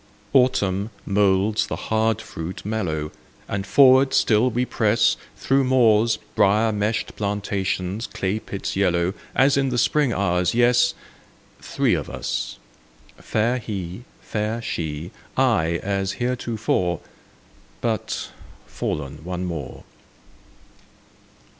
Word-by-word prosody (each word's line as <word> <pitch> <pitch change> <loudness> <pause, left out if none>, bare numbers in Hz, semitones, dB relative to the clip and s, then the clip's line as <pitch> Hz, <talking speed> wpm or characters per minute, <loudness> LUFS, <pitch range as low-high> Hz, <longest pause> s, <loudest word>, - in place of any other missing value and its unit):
Autumn 105 -6 +2 0.2
moulds 100 +1 +2
the - - -3
hard 110 0 0
fruit 80 +4 -7
mellow, 80 -8 -2 0.4
And 100 -1 -3
forward 135 +3 +6
still 115 +3 +4
we 125 +2 0
press 110 -1 +2 0.2
Through 135 0 +2
moors, 115 -3 +4 0.2
briar 110 +3 +3
meshed 105 +1 -1
plantations, 100 0 -2
clay 95 +3 -2
pits 100 -2 -5
yellow, 90 -2 +1 0.2
As 135 +1 +4
in 135 -1 +2
the 125 - -1
spring 145 +2 +2
hours—yes, 115 +6 +2 0.7
Three - - +1
of - - -2
us: - - -3 0.6
fair 115 +4 0
He, 95 -2 -6 0.2
fair 110 +2 -2
She, 80 -7 -4 0.3
I, 80 +1 +2
as 100 0 -1
heretofore, 115 -7 -1 0.8
But—fallen 75 +1 -5
one 90 +1 -4
more. 80 -7 -6
105 Hz, 105 wpm, -23 LUFS, 90-115 Hz, 0.8 s, forward